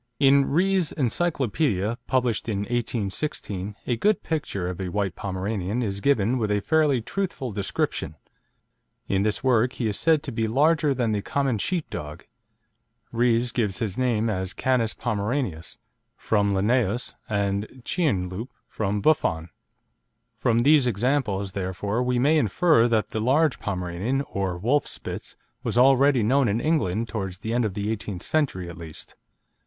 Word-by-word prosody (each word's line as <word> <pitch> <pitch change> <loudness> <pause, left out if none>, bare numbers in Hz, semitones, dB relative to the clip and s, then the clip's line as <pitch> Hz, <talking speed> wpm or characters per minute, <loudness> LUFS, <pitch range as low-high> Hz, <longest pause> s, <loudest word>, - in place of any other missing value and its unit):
In 140 0 +5
Rees' 185 +1 +2
Encyclopedia, 130 - 0
published 125 -4 0
in 100 -2 -1
1816, 105 -2 -3
a 120 - 0
good 210 - +2
picture 145 - -2
of 90 +1 -4
a 95 - -3
white 100 -2 -1
Pomeranian 100 +4 -3
is 100 -2 -3
given 125 -2 +2
with 110 -2 0
a 105 0 +2
fairly 150 0 +2
truthful 175 - -3
description. 95 -6 -2 0.9
In 95 0 +1
this 105 0 0
work 125 -1 +3
he 120 - -3
is 105 -2 -1
said 160 -2 +3
to 140 - -4
be 115 -1 -1
"larger 145 +4 +3
than 120 -3 0
the 105 -1 0
common 135 0 -1
sheep 175 - -1
dog." 75 +3 -7 0.9
Rees 120 0 +2
gives 105 -6 -1
his 105 -5 -2
name 120 -3 +1
as 95 -3 -2
Canis 125 -4 +1
Pomeranius, 105 - -2 0.4
from 100 -2 +1
Linnaeus, 115 +3 +1 0.2
and 100 +4 -2
Chien 130 - 0
Loup, 105 +8 -6 0.2
from 105 -1 -2
Buffon. 85 - +1 0.9
From 115 -1 +1
these 145 -2 +5
examples, 110 -4 0
therefore, 100 +4 -2
we 125 0 +1
may 150 +6 +4
infer 120 - +3
that 110 -2 +1
the 110 - -3
large 135 +3 +2
Pomeranian, 95 +7 -2
or 95 -7 -3
Wolf 125 +11 +1
Spitz, - - -6 0.3
was - - -2
already 135 0 +5
known 130 +4 +3
in 105 +2 +1
England 115 - 0
towards 95 -4 -4
the 110 +3 -4
end 120 -1 +2
of 100 -3 -3
the 105 +1 -1
eighteenth 100 -4 -5
century 135 - 0
at 85 +1 -9
least. 80 -2 -10
115 Hz, 155 wpm, -25 LUFS, 100-135 Hz, 0.9 s, In